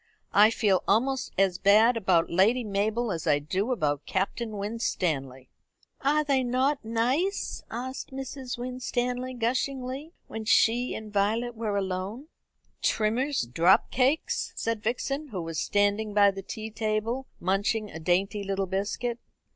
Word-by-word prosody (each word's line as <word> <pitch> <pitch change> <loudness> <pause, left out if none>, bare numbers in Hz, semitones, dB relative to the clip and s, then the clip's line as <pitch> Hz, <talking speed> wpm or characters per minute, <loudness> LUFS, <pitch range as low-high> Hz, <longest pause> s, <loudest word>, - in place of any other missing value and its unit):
"I 210 +2 +7
feel 205 -5 +2
almost 260 +6 +1
as 190 -2 +2
bad 215 +5 +5
about 185 -6 +2
Lady 215 +8 +3
Mabel 215 +3 0
as 165 -2 -4
I 150 -2 +4
do 185 - -2
about 150 - -1
Captain 210 +3 -2
Winstanley." 160 - -2 0.5
"Are 300 +2 +3
they 275 -3 +2
not 260 +3 +1
nice?" 250 - 0
asked 255 +3 -5
Mrs. 265 -1 -5
Winstanley 250 0 -3
gushingly, 260 +5 -2
when 220 - -6
she 235 +3 +3
and 215 -1 -8
Violet 220 +4 +1
were 215 -2 -2
alone. 195 +9 -3 0.5
"Trimmer's 245 +7 +1
drop 165 +10 +3
cakes?" 265 +5 +1
said 230 -2 -2
Vixen, 275 +6 -2
who 190 -9 -5
was 165 -2 -4
standing 205 +1 +1
by 200 -1 +6
the 195 0 -7
tea 220 +3 -7
table 220 +4 -2
munching 200 +3 0
a 160 - -7
dainty 190 +5 0
little 195 0 -1
biscuit. 205 +5 -2
220 Hz, 140 wpm, -27 LUFS, 195-250 Hz, 0.5 s, I